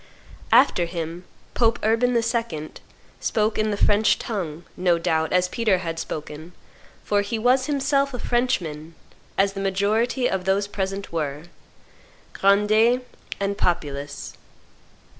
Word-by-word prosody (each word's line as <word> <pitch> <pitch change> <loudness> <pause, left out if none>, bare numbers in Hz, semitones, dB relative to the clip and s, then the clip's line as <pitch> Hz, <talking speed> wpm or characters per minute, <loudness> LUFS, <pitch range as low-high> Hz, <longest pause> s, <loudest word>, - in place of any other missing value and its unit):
After 175 - +5
him 170 0 -5 0.3
Pope 230 -1 +2
Urban 230 +3 +2
II. 230 -10 -1 0.5
spoke, 215 0 0
in 215 0 +1
the 205 - -1
French 205 +1 +3
tongue, 175 -7 -4
no 180 -2 +2
doubt, 160 -1 0
as 180 0 +3
Peter 215 -1 +1
had 165 -2 -4
spoken, 155 +3 -6 0.5
for 205 -1 +1
he 205 +3 -3
was 255 +4 +2
himself 275 -1 +1
a 250 - -4
Frenchman, 170 -12 -1 0.4
as 195 0 +2
the 195 - -5
majority 215 +6 +1
of 190 -1 -2
those 195 +1 +2
present 195 0 -4
were, 150 -2 -3 0.9
grandees 215 +5 +3 0.4
and 200 0 -2
populace. 145 -5 -2
200 Hz, 125 wpm, -23 LUFS, 170-225 Hz, 0.9 s, After